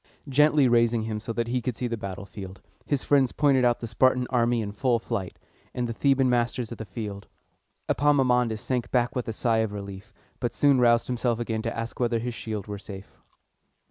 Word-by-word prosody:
Gently 145 Hz, 0 st, +4 dB
raising 120 Hz, -1 st, +3 dB
him 110 Hz, -1 st, -3 dB
so 115 Hz, +2 st, -5 dB
that 115 Hz, 0 st, -1 dB
he 125 Hz, +1 st, 0 dB
could 125 Hz, -1 st, -3 dB
see 125 Hz, -, -3 dB
the 120 Hz, -1 st, -1 dB
battlefield, 95 Hz, -2 st, -8 dB, 0.3 s
his 145 Hz, -3 st, 0 dB
friends 135 Hz, -3 st, +3 dB
pointed 140 Hz, -3 st, +3 dB
out 120 Hz, -1 st, +2 dB
the -, -, -3 dB
Spartan 125 Hz, +3 st, +2 dB
army 120 Hz, -1 st, +2 dB
in 105 Hz, -2 st, -3 dB
full 120 Hz, +3 st, +1 dB
flight, 115 Hz, -5 st, -4 dB, 0.4 s
and 125 Hz, -1 st, -1 dB
the 115 Hz, -, -3 dB
Thebans 135 Hz, +1 st, +2 dB
masters 120 Hz, -1 st, 0 dB
of 115 Hz, -, -7 dB
the 110 Hz, -, -5 dB
field. 100 Hz, 0 st, -6 dB, 0.6 s
Epaminondas 125 Hz, -6 st, +2 dB
sank 125 Hz, -2 st, -2 dB
back 125 Hz, +2 st, +1 dB
with 125 Hz, -, -2 dB
a 115 Hz, -, -2 dB
sigh 115 Hz, 0 st, +1 dB
of 110 Hz, -2 st, 0 dB
relief, 100 Hz, +1 st, -8 dB, 0.3 s
but 120 Hz, -2 st, -2 dB
soon 140 Hz, -3 st, +4 dB
roused 120 Hz, -1 st, +4 dB
himself 120 Hz, -2 st, -1 dB
again 115 Hz, -2 st, -2 dB
to 115 Hz, 0 st, -4 dB
ask 115 Hz, 0 st, -5 dB
whether 120 Hz, -1 st, +1 dB
his 120 Hz, +1 st, -3 dB
shield 110 Hz, -3 st, -5 dB
were 105 Hz, -1 st, -6 dB
safe. 100 Hz, -1 st, -11 dB
120 Hz, 205 wpm, -26 LUFS, 110-125 Hz, 0.6 s, Gently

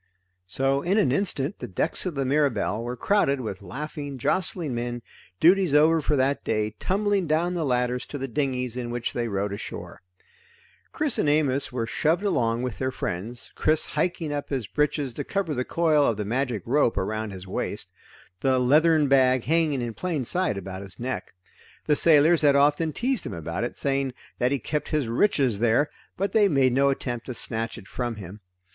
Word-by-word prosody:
So 135 Hz, +8 st, +1 dB
in 185 Hz, +6 st, +1 dB
an 200 Hz, -12 st, +3 dB
instant 150 Hz, 0 st, -1 dB
the -, -, -5 dB
decks 155 Hz, -, -1 dB
of 175 Hz, -, -4 dB
the 135 Hz, -1 st, -1 dB
Mirabelle 130 Hz, -6 st, +1 dB
were 120 Hz, +1 st, -4 dB
crowded 140 Hz, -, +2 dB
with 110 Hz, -5 st, -5 dB
laughing 145 Hz, -, -6 dB
jostling 165 Hz, +1 st, -1 dB
men, 120 Hz, 0 st, -4 dB, 0.4 s
duties 180 Hz, -2 st, +4 dB
over 160 Hz, +2 st, +5 dB
for 150 Hz, +1 st, +1 dB
that 135 Hz, +1 st, +1 dB
day, 110 Hz, -1 st, 0 dB
tumbling 200 Hz, -1 st, 0 dB
down 165 Hz, +4 st, +1 dB
the 170 Hz, -2 st, -1 dB
ladders 125 Hz, -2 st, 0 dB
to 145 Hz, -, -6 dB
the 135 Hz, 0 st, -4 dB
dinghies 125 Hz, -2 st, -2 dB
in 125 Hz, -1 st, -4 dB
which 120 Hz, 0 st, -3 dB
they 120 Hz, -1 st, -1 dB
rowed 100 Hz, -1 st, -2 dB
ashore. 100 Hz, -, -7 dB, 0.9 s
Chris 300 Hz, -5 st, -1 dB
and 145 Hz, -, +2 dB
Amos 145 Hz, -2 st, +1 dB
were 120 Hz, -2 st, -2 dB
shoved 160 Hz, -, 0 dB
along 120 Hz, -, +1 dB
with 125 Hz, -3 st, -4 dB
their 130 Hz, -, 0 dB
friends, 115 Hz, -1 st, -4 dB
Chris 155 Hz, 0 st, +1 dB
hiking 165 Hz, -4 st, -2 dB
up 145 Hz, -1 st, -4 dB
his 130 Hz, -5 st, -2 dB
breeches 145 Hz, 0 st, -1 dB
to -, -, -4 dB
cover 195 Hz, -6 st, -2 dB
the 125 Hz, -2 st, -1 dB
coil 155 Hz, 0 st, +2 dB
of 115 Hz, -6 st, +1 dB
the 105 Hz, -, -3 dB
magic 120 Hz, -2 st, -1 dB
rope 125 Hz, -2 st, +2 dB
around 110 Hz, +3 st, -2 dB
his 95 Hz, -2 st, -8 dB
waist; 95 Hz, -, -4 dB, 0.5 s
the 130 Hz, +5 st, +2 dB
leathern 150 Hz, +4 st, +4 dB
bag 130 Hz, -2 st, +4 dB
hanging 155 Hz, -5 st, +1 dB
in 115 Hz, -1 st, -4 dB
plain 160 Hz, -2 st, -2 dB
sight 180 Hz, -, 0 dB
about 95 Hz, 0 st, -6 dB
his 95 Hz, -2 st, -10 dB
neck. 125 Hz, -5 st, -4 dB, 0.5 s
The 150 Hz, -, +3 dB
sailors 160 Hz, +2 st, +5 dB
had 145 Hz, -2 st, +5 dB
often 145 Hz, +3 st, +3 dB
teased 250 Hz, -, -1 dB
him -, -, -5 dB
about 85 Hz, +4 st, -4 dB
it, 120 Hz, -, -4 dB
saying 135 Hz, -2 st, 0 dB, 0.2 s
that 125 Hz, +1 st, +2 dB
he 140 Hz, -, +2 dB
kept 150 Hz, +4 st, -3 dB
his 150 Hz, -5 st, 0 dB
riches 125 Hz, -, +2 dB
there, 120 Hz, +6 st, +2 dB, 0.3 s
but 195 Hz, +2 st, -1 dB
they 210 Hz, -2 st, +4 dB
made 135 Hz, -7 st, +3 dB
no 140 Hz, +2 st, +4 dB
attempt 125 Hz, -3 st, -3 dB
to 125 Hz, -, -4 dB
snatch 115 Hz, 0 st, -2 dB
it 95 Hz, -, -11 dB
from 120 Hz, -2 st, -3 dB
him. 100 Hz, 0 st, -9 dB
135 Hz, 190 wpm, -25 LUFS, 120-155 Hz, 0.9 s, over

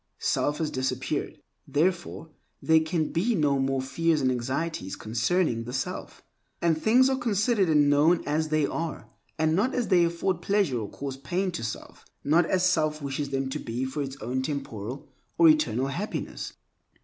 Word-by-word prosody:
Self 145 Hz, 0 st, 0 dB
has 155 Hz, -2 st, -2 dB
disappeared. 130 Hz, -2 st, -2 dB, 0.3 s
Therefore, 170 Hz, 0 st, -1 dB, 0.3 s
there 160 Hz, 0 st, +4 dB
can 160 Hz, 0 st, -1 dB
be 215 Hz, +8 st, +1 dB
no 145 Hz, -5 st, +2 dB
more 135 Hz, 0 st, 0 dB
fears 160 Hz, +4 st, +1 dB
and 130 Hz, -2 st, +2 dB
anxieties 130 Hz, -, -3 dB
concerning 115 Hz, +3 st, 0 dB
the 125 Hz, -, -6 dB
self, 130 Hz, -, -4 dB, 0.4 s
and 170 Hz, -2 st, +2 dB
things 235 Hz, +10 st, +4 dB
are 265 Hz, -, +2 dB
considered 215 Hz, -4 st, +1 dB
and 150 Hz, -2 st, +4 dB
known 150 Hz, +4 st, +4 dB
as 155 Hz, +2 st, 0 dB
they 155 Hz, -1 st, +2 dB
are, 165 Hz, +2 st, -4 dB, 0.3 s
and 160 Hz, 0 st, +2 dB
not 230 Hz, +8 st, +1 dB
as 245 Hz, -3 st, -1 dB
they 180 Hz, -3 st, +5 dB
afford 170 Hz, +1 st, -1 dB
pleasure 195 Hz, -, +1 dB
or 105 Hz, -3 st, -5 dB
cause 135 Hz, -1 st, -6 dB
pain 185 Hz, +6 st, -2 dB
to 115 Hz, -, -5 dB
self, 110 Hz, -, -6 dB, 0.2 s
not 165 Hz, +3 st, +3 dB
as 185 Hz, -1 st, +2 dB
self 155 Hz, -4 st, +1 dB
wishes 140 Hz, 0 st, -3 dB
them 135 Hz, -1 st, -1 dB
to 150 Hz, +3 st, -3 dB
be 120 Hz, +1 st, -3 dB
for 130 Hz, +3 st, -3 dB
its 135 Hz, -1 st, -5 dB
own 125 Hz, +3 st, -1 dB
temporal 130 Hz, -3 st, -5 dB, 0.3 s
or 165 Hz, -1 st, +7 dB
eternal 130 Hz, -5 st, +2 dB
happiness. 185 Hz, +10 st, -4 dB
155 Hz, 175 wpm, -27 LUFS, 135-170 Hz, 0.4 s, or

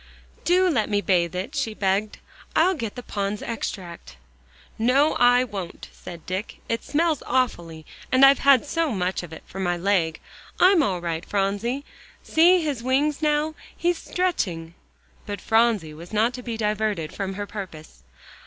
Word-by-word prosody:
"Do 365 Hz, +2 st, +4 dB
let 245 Hz, -12 st, +1 dB
me 205 Hz, -1 st, +2 dB
bathe 180 Hz, -3 st, +1 dB
it," 185 Hz, +10 st, -4 dB
she 265 Hz, -7 st, -2 dB
begged. 200 Hz, +2 st, 0 dB, 0.4 s
"I'll 360 Hz, +4 st, +4 dB
get 230 Hz, -, -5 dB
the 245 Hz, -, -7 dB
Pond's 200 Hz, -1 st, -3 dB
Extract." 180 Hz, -, -6 dB, 0.6 s
"No, 265 Hz, +7 st, +3 dB
I 245 Hz, +1 st, +5 dB
won't," 200 Hz, -8 st, -7 dB
said 170 Hz, -2 st, -11 dB
Dick. 185 Hz, +4 st, -4 dB
"It 230 Hz, -, -2 dB
smells 315 Hz, -1 st, +1 dB
awfully, 170 Hz, -11 st, -1 dB, 0.3 s
and 260 Hz, +1 st, +7 dB
I've 275 Hz, 0 st, +6 dB
had 275 Hz, -1 st, +5 dB
so 325 Hz, 0 st, 0 dB
much 185 Hz, -1 st, -1 dB
of 175 Hz, -3 st, -10 dB
it 160 Hz, -, -10 dB
for 195 Hz, -, -9 dB
my 175 Hz, -2 st, 0 dB
leg. 175 Hz, -3 st, +1 dB, 0.4 s
I'm 365 Hz, -2 st, +6 dB
all 190 Hz, -, 0 dB
right, 165 Hz, -1 st, -3 dB
Phronsie. 205 Hz, +8 st, -1 dB, 0.4 s
See 345 Hz, +2 st, +4 dB
his 285 Hz, -6 st, -2 dB
wings 280 Hz, +4 st, +1 dB
now 300 Hz, 0 st, +1 dB, 0.2 s
he's 345 Hz, -1 st, 0 dB
stretching." 180 Hz, -, -2 dB, 0.5 s
But 205 Hz, -1 st, -4 dB
Phronsie 220 Hz, -8 st, +2 dB
was 165 Hz, +3 st, -11 dB
not 220 Hz, +3 st, +2 dB
to 250 Hz, -, -7 dB
be 235 Hz, -2 st, -5 dB
diverted 210 Hz, -6 st, -1 dB
from 195 Hz, -1 st, -4 dB
her 205 Hz, +1 st, -4 dB
purpose. 180 Hz, -, -9 dB
215 Hz, 160 wpm, -24 LUFS, 185-275 Hz, 0.6 s, and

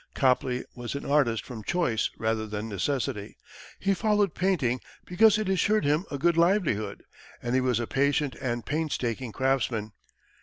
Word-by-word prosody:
Copley 130 Hz, -1 st, +1 dB
was 120 Hz, 0 st, -6 dB
an 140 Hz, -, -5 dB
artist 140 Hz, -6 st, +2 dB
from 115 Hz, -4 st, -8 dB
choice 125 Hz, -, 0 dB
rather 110 Hz, -1 st, -1 dB
than 105 Hz, +1 st, -4 dB
necessity; 110 Hz, +1 st, -2 dB, 0.4 s
he 195 Hz, 0 st, +1 dB
followed 210 Hz, -3 st, +1 dB
painting 150 Hz, -10 st, +1 dB, 0.2 s
because 210 Hz, +4 st, +5 dB
it 215 Hz, -2 st, -2 dB
assured 195 Hz, +2 st, +2 dB
him 150 Hz, +6 st, +2 dB
a 140 Hz, -, -3 dB
good 170 Hz, +3 st, +2 dB
livelihood, 165 Hz, -, +1 dB, 0.4 s
and 120 Hz, 0 st, -3 dB
he 130 Hz, -, +3 dB
was 125 Hz, -2 st, +1 dB
a 120 Hz, -, -1 dB
patient 140 Hz, +2 st, +1 dB
and 120 Hz, -2 st, -2 dB
painstaking 135 Hz, -6 st, -2 dB
craftsman. 125 Hz, -4 st, 0 dB
135 Hz, 155 wpm, -27 LUFS, 115-170 Hz, 0.4 s, because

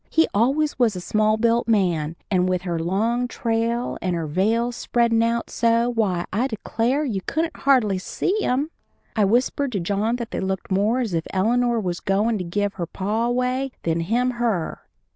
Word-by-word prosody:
He 325 Hz, -, +3 dB
always 275 Hz, +7 st, +1 dB
was 230 Hz, -5 st, +3 dB
a -, -, -3 dB
small 215 Hz, +4 st, +1 dB
built 230 Hz, +1 st, +2 dB
man, 175 Hz, -8 st, +1 dB, 0.2 s
and 185 Hz, -1 st, +2 dB
with 180 Hz, -1 st, 0 dB
her 170 Hz, -3 st, -2 dB
long 220 Hz, +9 st, 0 dB
trail 230 Hz, +1 st, -1 dB
and 180 Hz, -1 st, -1 dB
her 165 Hz, -1 st, -2 dB
veil 220 Hz, +10 st, +1 dB
spreadin' 235 Hz, -1 st, +1 dB
out 230 Hz, 0 st, 0 dB
so, 230 Hz, +1 st, +2 dB
why, 195 Hz, -7 st, 0 dB
I 235 Hz, +6 st, +1 dB
declare, 240 Hz, +4 st, -1 dB
you 205 Hz, -8 st, -2 dB
couldn't 325 Hz, +2 st, -1 dB
hardly 235 Hz, -9 st, +2 dB
see 370 Hz, -, -1 dB
him. 280 Hz, +2 st, 0 dB, 0.4 s
I 215 Hz, -3 st, +3 dB
whispered 250 Hz, +5 st, +1 dB
to 200 Hz, -, 0 dB
John 205 Hz, +6 st, 0 dB
that 235 Hz, -2 st, -5 dB
they -, -, -2 dB
looked 190 Hz, 0 st, -3 dB
more 210 Hz, +6 st, +2 dB
as 225 Hz, -7 st, -2 dB
if 165 Hz, -1 st, -1 dB
Eleanor 235 Hz, +4 st, +1 dB
was 180 Hz, -4 st, -2 dB
goin' 210 Hz, +3 st, +1 dB
to -, -, -2 dB
give 200 Hz, +3 st, -1 dB
her 170 Hz, -, -2 dB
pa 210 Hz, +6 st, -1 dB
away 250 Hz, +2 st, -1 dB
than 165 Hz, 0 st, 0 dB
him 235 Hz, +9 st, +1 dB
her. 230 Hz, -9 st, -1 dB
225 Hz, 185 wpm, -23 LUFS, 190-245 Hz, 0.4 s, He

